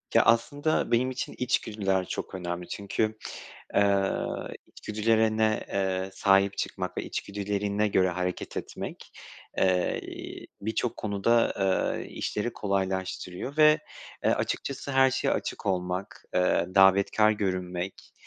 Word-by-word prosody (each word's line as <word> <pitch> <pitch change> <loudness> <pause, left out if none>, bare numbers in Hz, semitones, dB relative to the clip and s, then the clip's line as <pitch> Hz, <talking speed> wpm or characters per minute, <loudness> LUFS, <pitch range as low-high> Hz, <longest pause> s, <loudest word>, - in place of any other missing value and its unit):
Ya, - - +7
aslında 145 +7 +2
benim 125 +2 +3
için 130 - -4
içgüdüler 100 -6 0
çok - - -4
önemli 85 -1 -4
çünkü, 110 +2 -2 0.6
eee, 100 -1 +3 0.5
içgüdülerine, 110 0 +1
eee, 95 -1 -1
sahip 100 0 +3
çıkmak 90 -1 -3
ve - - -1
içgüdülerine 100 +1 -1
göre 95 -2 +3
hareket 90 0 -3
etmek, - - -6 0.5
eee, 90 -1 +2 0.6
birçok 110 +3 -1
konuda, 100 +2 0 0.2
aaa, 95 -1 +1
işleri 105 +3 -3
kolaylaştırıyor 95 +4 -2
ve, 155 0 +7 0.5
eee, - - +4
açıkçası 140 0 -2
her 135 0 +5
şeye 135 - 0
açık - - -3
olmak, 90 0 -2
eee, 90 -1 +3
davetkâr 100 +2 +5
görünmek, 95 -3 -3
100 Hz, 110 wpm, -28 LUFS, 95-110 Hz, 0.6 s, Ya